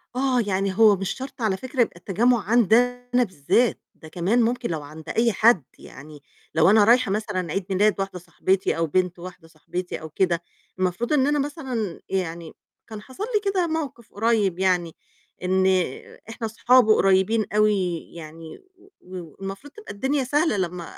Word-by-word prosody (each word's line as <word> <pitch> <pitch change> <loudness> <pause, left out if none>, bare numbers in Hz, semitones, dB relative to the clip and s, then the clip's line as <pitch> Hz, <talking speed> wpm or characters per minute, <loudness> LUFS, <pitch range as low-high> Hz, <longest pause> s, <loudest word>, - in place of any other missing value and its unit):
آه، 260 -1 +1
يعني 195 0 -1
هو 220 -2 +6
مش 195 0 -4
شرط 260 -1 -8
على 210 -4 0
فكرة 255 +3 -2
يبقى 230 - 0
التجمُّع 225 +7 +1
عندي 220 +1 +3 0.4
أنا 250 0 +4
بالذات، 200 - 0
ده 160 - -14
كمان 180 +9 0
ممكن 240 +1 -1
لو 160 -3 -3
عند 155 +2 -11
أي 230 +1 +2
حد، 215 - +4 0.2
يعني 150 0 -13 0.3
لو - - +5
أنا 215 +1 +6
رايحة 235 0 +4
مثلًا 195 -5 -2
عيد 195 +2 -2
ميلاد 200 +2 +2
واحدة 195 -2 -4
صاحبتي 185 +2 -1
أو 165 0 0
بنت 180 +2 0
واحدة 175 -1 -10
صاحبتي 175 +3 -6
أو 160 - -8
كده، 170 +1 0 0.4
المفروض 185 - -1
إن 275 -2 +3
أنا 295 0 +1
مثلًا 260 - -4
يعني 170 -3 -3 0.3
كان 220 -2 -8
حصل 260 - -8
لي 420 -3 0
كده 365 -3 0
موقِف 295 -8 -5
قُريّب 205 -4 +1
يعني، 180 -3 +1 0.5
إن 185 +1 +2 0.6
إحنا 225 0 -5
أصحاب 245 +2 +4
وقريّبين 205 +1 +3
أوي 200 -5 +2 0.2
يعني 160 -1 -10 0.2
و 375 +2 -22
والمفروض 195 - -9
تبقى 430 - -10
الدنيا 265 +7 -1
سهلة 295 -1 +1
لمّا 180 -2 -3
200 Hz, 165 wpm, -23 LUFS, 180-240 Hz, 0.6 s, هو